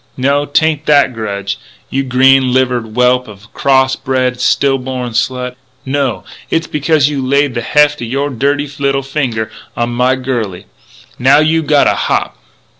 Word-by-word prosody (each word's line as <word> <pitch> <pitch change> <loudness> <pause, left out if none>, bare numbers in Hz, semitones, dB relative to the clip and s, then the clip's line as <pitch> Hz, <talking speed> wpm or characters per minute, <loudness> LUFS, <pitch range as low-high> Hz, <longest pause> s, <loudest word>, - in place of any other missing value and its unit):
No, 140 +2 +1
'tain't 155 +1 0
that 145 -3 +4
grudge, 100 -3 -4 0.3
you 135 - 0
green 130 0 +3
livered 125 -4 0
whelp 125 0 +2
of 100 -1 -13
a - - -16
cross 130 -1 +2
bred, 130 -2 -1
still 135 0 +2
born 125 -1 -4
slut! 125 +2 -2 0.3
No! 130 -8 -1 0.3
It's 165 0 0
becuz 150 -1 +1
you 145 -3 -2
laid 140 +1 +1
the 120 - -2
heft 150 +3 +2
o' - - -3
your 140 +5 -2
dirty 140 +3 0
little 140 -1 0
finger 125 -6 -2 0.3
onto 120 0 -1
my 125 +2 +2
girlie. 120 -8 -3
'N' - - -25
now 135 +3 +5
you 155 +2 +2
gotta 150 -2 +3
hop!" - - -1
130 Hz, 165 wpm, -14 LUFS, 125-140 Hz, 0.3 s, now